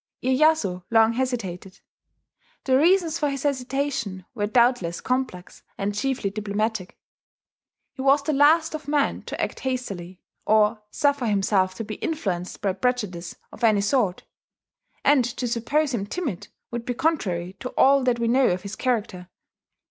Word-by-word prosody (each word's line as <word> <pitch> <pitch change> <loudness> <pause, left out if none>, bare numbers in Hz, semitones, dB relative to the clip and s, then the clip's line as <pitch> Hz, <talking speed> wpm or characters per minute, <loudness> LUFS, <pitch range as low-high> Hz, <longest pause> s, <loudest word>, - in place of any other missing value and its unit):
Iyeyasu 260 - +2
long 225 0 +4
hesitated. 225 -8 -3 0.8
The 260 - +2
reasons 335 +2 +3
for 295 - +1
his 275 -1 -4
hesitation 260 -8 -2
were 205 -4 -1
doubtless 235 -7 +2
complex, 250 -8 -3 0.2
and 200 +1 -2
chiefly 245 -2 -1
diplomatic. 210 -1 -3 1.0
He - - -7
was 275 +1 +4
the 305 - 0
last 315 +4 +4
of 310 -2 -6
men 290 -1 +1
to - - -6
act - - -2
hastily, 195 -9 -4 0.2
or 215 +1 +3
suffer 285 -2 +1
himself 195 -2 +1
to 225 - -4
be 215 -1 -6
influenced 190 - -3
by 195 -2 +1
prejudice 195 -5 -2 0.2
of - - -12
any 215 -3 +4
sort; 205 -4 +1 0.8
and 285 -3 +5
to 245 +1 -3
suppose 270 +5 0
him 200 -4 -2
timid 265 - -4 0.2
would 235 -1 -4
be 245 0 -3
contrary 185 - -1
to 255 - -5
all 275 0 +5
that 245 -2 +2
we 235 -1 -1
know 255 +2 +4
of 180 0 -1
his 200 +1 -6
character. 210 -8 -2
235 Hz, 150 wpm, -24 LUFS, 200-270 Hz, 1.0 s, and